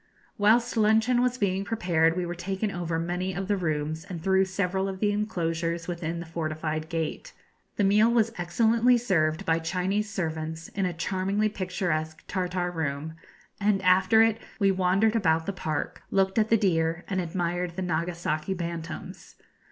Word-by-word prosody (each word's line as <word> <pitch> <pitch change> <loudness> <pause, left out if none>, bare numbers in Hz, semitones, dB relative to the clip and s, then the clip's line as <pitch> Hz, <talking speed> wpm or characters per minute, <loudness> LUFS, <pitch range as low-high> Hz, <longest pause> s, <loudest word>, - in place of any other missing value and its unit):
Whilst 230 +4 +3
luncheon 220 +3 +4
was 250 0 +1
being 195 -3 0
prepared 175 -6 +1
we 180 - -1
were 175 - -3
taken 190 +4 -3
over 170 -3 -2
many 180 +3 -2
of 195 0 -3
the 205 - +2
rooms 155 -3 -2
and 180 -4 -6
through 190 +3 +3
several 190 0 -1
of 190 -1 -6
the 205 0 +2
enclosures 170 -5 -2
within 170 -1 -3
the 170 - -6
fortified 155 -1 -3
gate. 165 - -3 0.4
The 205 - +1
meal 210 +3 +5
was 230 -1 +2
excellently 230 +7 +3
served 160 -9 +1
by 165 0 +2
Chinese 190 +5 -1
servants 160 -3 -4
in 195 -2 -1
a 180 - -3
charmingly 190 +5 0
picturesque 175 -5 -2
Tartar 180 -1 -1
room, 155 -1 -3 0.5
and 205 -1 +2
after 190 +5 +5
it 225 0 +2 0.2
we 195 -2 +4
wandered 190 +4 +2
about 165 -6 +2
the 200 - -2
park, 155 -5 -3
looked 195 +2 +2
at 220 0 +2
the 225 - +5
deer, 165 -4 +1
and 185 -1 -1
admired 175 0 -2
the 190 - -3
Nagasaki 170 0 -2
bantams. 170 -1 -6
180 Hz, 165 wpm, -27 LUFS, 165-200 Hz, 0.5 s, meal